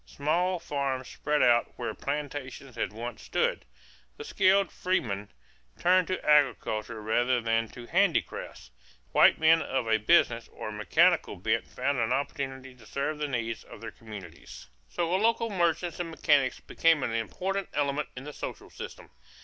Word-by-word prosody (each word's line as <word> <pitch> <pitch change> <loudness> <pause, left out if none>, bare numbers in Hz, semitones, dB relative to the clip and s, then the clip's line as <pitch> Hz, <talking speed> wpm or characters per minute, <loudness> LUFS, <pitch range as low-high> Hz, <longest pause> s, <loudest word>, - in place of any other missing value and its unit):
Small 175 +6 0
farms 140 -5 -3
spread 150 0 0
out 120 -1 +3
where - - -4
plantations 140 -3 -5
had 115 - -2
once 115 +3 -6
stood. - - -1 0.5
The - - -7
skilled 190 0 +3
freedmen 105 - -1 0.5
turned 180 0 +3
to 185 - -1
agriculture 125 -6 +2
rather 120 +3 +2
than 115 0 0
to 120 +2 -11
handicrafts; 170 - 0 0.4
white - - +6
men 160 +1 +5
of 130 -3 -2
a 110 0 +4
business 115 -2 +3
or 110 - -7
mechanical 160 - +2
bent 110 +5 -1
found 135 +1 -1
an 115 +1 0
opportunity 135 -1 -3
to 120 -3 -18
serve 145 +5 -2
the 150 - -1
needs 115 -4 -3
of - - -12
their 115 0 -7
communities. 100 -8 -11 0.2
So 170 - -1
local 230 +2 +1
merchants 170 -2 0
and 175 -1 -3
mechanics 145 -5 +2
became 165 -4 +2
an - - -1
important 185 - -2
element 145 0 -1
in 130 - -6
the 150 +1 -8
social - - -7
system. - - -9
140 Hz, 155 wpm, -28 LUFS, 115-165 Hz, 0.5 s, white